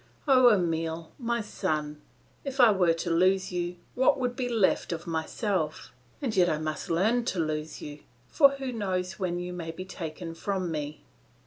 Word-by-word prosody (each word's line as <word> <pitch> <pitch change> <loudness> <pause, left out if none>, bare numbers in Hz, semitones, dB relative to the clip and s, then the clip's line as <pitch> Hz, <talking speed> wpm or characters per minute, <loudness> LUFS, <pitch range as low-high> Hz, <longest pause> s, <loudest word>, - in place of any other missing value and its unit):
Oh, 255 -2 +7
Emile! 165 -4 -1
my 235 -1 -1
son! 155 -8 -3 0.4
if 275 -1 -5
I 240 -3 +8
were 185 -4 +3
to 170 +1 -3
lose 185 +3 +3
you, 175 0 -2 0.2
what 260 +2 +3
would 250 -1 -1
be 250 -1 -2
left 220 -6 +2
of 170 0 -4
myself? 160 0 -2 0.3
And 235 -6 -1
yet 180 -2 +4
I 155 - +1
must 155 0 -4
learn 215 +9 +2
to 195 - -1
lose 155 -1 -3
you, 150 0 -7 0.3
for 280 - +6
who 270 -2 -4
knows 185 -5 -2
when 180 -2 -1
you 180 0 -4
may 170 -2 -5
be 175 +3 -6
taken 165 -2 -6
from 185 0 -2
me? 150 -1 -4
180 Hz, 180 wpm, -28 LUFS, 165-215 Hz, 0.4 s, I